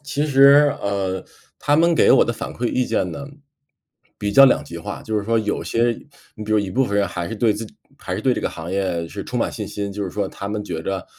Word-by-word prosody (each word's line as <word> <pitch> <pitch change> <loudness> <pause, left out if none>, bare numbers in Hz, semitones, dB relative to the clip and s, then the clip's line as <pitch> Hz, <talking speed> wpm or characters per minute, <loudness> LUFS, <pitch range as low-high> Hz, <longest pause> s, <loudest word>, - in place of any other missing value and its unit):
其 145 +1 -1
实， 140 +1 +6
呃， 95 -2 -2 0.4
他 145 - +1
们 170 +2 +4
给 - - +4
我 - - +6
的 - - -1
反 - - -6
馈 120 - -2
意 130 - 0
见 90 - -1
呢， 140 +12 -7 0.9
比 105 - -2
较 135 +6 +9
两 135 - +3
极 85 +3 -8
化。 85 - -7
就 110 -1 -1
是 100 - -4
说 115 +2 +1
有 105 -1 -2
些 115 - 0 0.5
你 110 - -7
比 110 - -2
如 110 - +4
一 100 -2 -2
部 130 +7 +2
分 100 -4 -2
人 100 -1 +2
还 85 -1 -4
是 - - -5
对 110 0 +2
自 110 +2 -6
己 - - -18 0.2
还 90 - -5
是 95 - -3
对 130 - +3
这 - - -2
个 - - -1
行 80 +1 -8
业 90 -4 -1
是 - - -7
充 - - -3
满 - - 0
信 - - -6
心， 100 -1 -5
就 100 0 -4
是 95 - -5
说 100 +1 -2
他 100 - -7
们 105 0 -3
觉 80 -5 -5
得， 95 0 -3
105 Hz, 290 characters per minute, -21 LUFS, 95-125 Hz, 0.9 s, 较